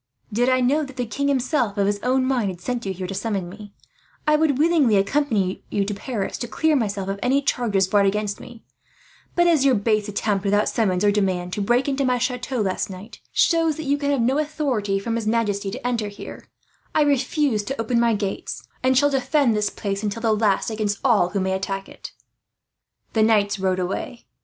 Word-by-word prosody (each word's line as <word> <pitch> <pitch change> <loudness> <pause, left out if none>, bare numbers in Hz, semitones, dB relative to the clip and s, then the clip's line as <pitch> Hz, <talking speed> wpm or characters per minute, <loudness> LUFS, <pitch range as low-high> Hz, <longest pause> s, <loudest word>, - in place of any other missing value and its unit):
Did 245 +4 +2
I 255 0 +3
know 280 +5 +2
that 270 -2 -9
the 250 -1 -2
king 275 +6 -2
himself, 255 -5 0
of 200 - +2
his 205 0 0
own 255 +1 +1
mind, 250 -6 +1
had 180 -2 -7
sent 235 +4 -3
you - - -1
here 185 0 -5
to 190 - -5
summons 195 -1 -2
me, 205 +3 -11 0.5
I 305 - +4
would 300 -3 +2
willingly 300 -7 +3
accompany 200 -3 0
you 200 -1 0
to 205 - -3
Paris, 205 -1 -4
to 240 - -3
clear 315 +6 +1
myself 200 -6 -1
from 195 0 -3
any 265 +3 +2
charges 210 -8 +1
brought 200 0 +3
against 205 0 -1
me; 240 -2 -12 0.7
but 345 - +4
as 325 -5 +4
your 270 -2 +4
base 215 0 +1
attempt, 205 -1 -1
without 205 +1 +2
summons 200 -4 +1
or 205 - +5
demand, 185 -3 -1
to 205 - -2
break 240 +6 +2
into 275 0 0
my 250 -1 +2
chateau 250 0 -2
last 190 -1 -1
night 190 +3 -10
shows 330 -2 +2
that 315 - -5
you 280 +1 +2
can 285 0 -2
have 280 -3 +1
no 260 +5 +2
authority 275 -10 -1
from 225 +4 -3
his 225 -2 -2
majesty 210 -3 0
to 200 - -7
enter 230 -4 -1
here, 205 0 -10 0.5
I 305 - +5
refuse 280 -3 +1
to 270 +2 -4
open 235 +1 +1
my 235 -1 +3
gates; 200 -2 -4
and 260 0 +2
shall 285 +2 +4
defend 265 -2 +2
this 210 -1 +1
place 200 -1 -4
until 215 +2 -3
the 225 -1 +3
last, 210 0 +1
against 210 -2 -1
all 215 -9 +3
who 200 - -2
may 190 0 0
attack 195 0 -3
it." - - -10 1.0
The 220 - +2
knights 205 -2 +3
rode 190 -1 +1
away. 190 +6 -4
225 Hz, 215 wpm, -23 LUFS, 200-260 Hz, 1.0 s, or